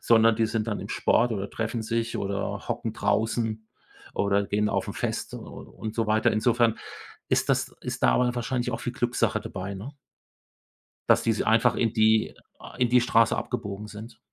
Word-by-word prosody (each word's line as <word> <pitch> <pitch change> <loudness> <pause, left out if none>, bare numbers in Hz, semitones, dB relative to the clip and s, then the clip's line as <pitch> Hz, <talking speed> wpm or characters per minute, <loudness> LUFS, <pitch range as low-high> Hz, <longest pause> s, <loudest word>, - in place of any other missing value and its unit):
sondern 115 -1 +5
die 115 0 +2
sind 110 0 -2
dann 105 - -2
im - - -7
Sport 120 0 +2
oder 100 -2 -3
treffen 115 0 -3
sich 115 +1 -2
oder 100 0 -3
hocken - - -2
draußen 110 -1 0 0.5
oder 100 0 +1
gehen 105 +1 +1
auf - - -1
'n - - -5
Fest - - -3
u - - -6
und 110 0 -8
so 115 -1 0
weiter. 110 +1 +3
Insofern 115 +1 +2 0.5
ist - - +1
das - - +1
ist - - -5
da 60 - +6
aber 125 - +2
wahrscheinlich 120 0 -1
auch 115 - -4
viel 120 - -3
Glückssache 120 -3 0
dabei, 100 0 -6
ne 110 +10 -8 1.2
dass - - +5
die 115 - +2
se 105 - -2
äh, - - -3
einfach 115 +1 +4
in 115 -2 +1
die 110 -1 +3 0.4
in 125 -1 +2
die 125 +1 +5
Straße 115 -1 +3
abgebogen 100 +1 -4
sind. 110 +2 -10
110 Hz, 190 wpm, -26 LUFS, 105-115 Hz, 1.2 s, da